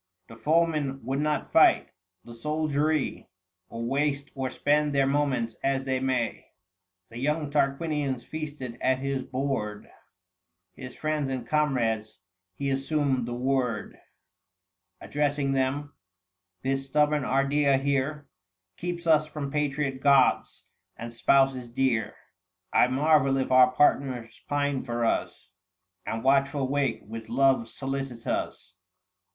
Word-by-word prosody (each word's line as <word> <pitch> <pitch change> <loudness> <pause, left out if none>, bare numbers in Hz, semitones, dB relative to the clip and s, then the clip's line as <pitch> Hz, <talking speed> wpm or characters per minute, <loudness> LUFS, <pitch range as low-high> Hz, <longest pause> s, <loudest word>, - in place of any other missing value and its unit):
The 115 - -11
foeman 150 -1 0
would 135 +2 -1
not 150 0 -1
fight; - - +5 0.4
the 120 - -10
soldiery, 150 0 -1 0.4
Or 115 0 -6
waste 140 +2 -1
or 130 -1 -3
spend 145 +2 +1
their 135 -1 +4
moments 135 -5 0
as 135 -1 +1
they 130 -1 0
may. 130 -3 -1 0.6
The 115 - -8
young 150 +2 -1
Tarquinius 140 -2 0
feasted 145 -6 -6
at 130 0 +2
his 135 0 -2
board 130 -6 -3 0.9
His 125 +4 -9
friends 155 -3 -1
and 130 -3 -4
comrades: 120 -9 0 0.4
he 140 -1 -2
assumed 135 -2 0
the 120 - -4
word 125 -3 -1 1.1
780 - - -7
Addressing 145 -1 0
them 135 +2 -1 0.2
— 90 0 -60
" 90 0 -56
This 135 +1 0
stubborn 150 +1 +2
Ardea 140 +1 +2
here 140 +2 -1 0.5
Keeps 175 0 -4
us 155 -2 +4
from 150 -2 -5
patriot 140 -2 -1
gods 140 -1 +3 0.3
and 115 +1 -7
spouses 135 0 +2
dear; 120 -3 0 0.6
I - - +5
marvel 135 0 +3
if 130 -1 -1
our 130 0 +7
partners 125 -4 +1
pine 145 -2 0
for 120 -2 -2
us, 95 -4 -2 0.6
And 115 0 -3
watchful 135 0 +2
wake 140 -5 0
with 110 +1 -8
love 130 -2 +2
solicitous 135 -8 -4
135 Hz, 125 wpm, -27 LUFS, 125-145 Hz, 1.1 s, our